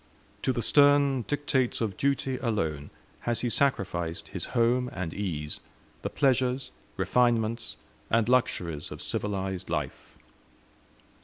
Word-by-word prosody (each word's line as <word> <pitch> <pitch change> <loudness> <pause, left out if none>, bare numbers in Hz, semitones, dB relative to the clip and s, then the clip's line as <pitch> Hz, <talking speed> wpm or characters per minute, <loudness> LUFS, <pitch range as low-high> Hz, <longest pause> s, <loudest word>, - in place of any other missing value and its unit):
To 130 - +2
the 120 -2 -1
stern 145 -2 +5
dictates 140 -4 0
of 110 -5 -1
duty, 135 +1 0
alone, 80 - -1 0.3
has 120 -1 -1
he 120 - 0
sacrificed 90 -12 0
his - - -4
home 125 +2 +3
and 95 -4 -4
ease, 80 -7 -3 0.4
the - - -2
pleasures, 130 -1 +1 0.3
refinements, 115 -2 +1 0.3
and 115 -1 +3
luxuries 90 -11 +1
of - - -8
civilized 95 -3 -2
life. 75 -5 -4
115 Hz, 120 wpm, -28 LUFS, 95-130 Hz, 0.4 s, stern